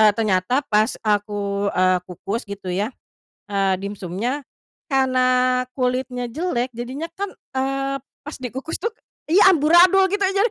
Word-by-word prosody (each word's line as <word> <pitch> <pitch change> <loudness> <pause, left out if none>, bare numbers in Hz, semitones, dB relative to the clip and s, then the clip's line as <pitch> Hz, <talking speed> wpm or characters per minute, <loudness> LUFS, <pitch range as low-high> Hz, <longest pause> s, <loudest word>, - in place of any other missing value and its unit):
ternyata 220 +5 +1
pas 215 +1 +3
aku, 205 -1 0
eee, 185 0 +3
kukus 195 +5 -4
gitu 200 -2 -6
ya, 200 +4 0 0.6
eee, 195 -2 +1
dimsumnya, 200 +7 -3 0.5
karena 255 -1 +3 0.2
kulitnya 250 0 -1
jelek 250 -3 -2
jadinya 255 +7 -5
kan, 400 0 -3 0.2
eee, 270 +1 -1 0.3
pas 300 - -6
dikukus 265 +6 -5
tuh 460 - 0 0.4
iya 380 +4 +6
amburadul 350 +5 +5
gitu 405 - 0
jadi 400 +4 +2
250 Hz, 125 wpm, -22 LUFS, 205-280 Hz, 0.6 s, iya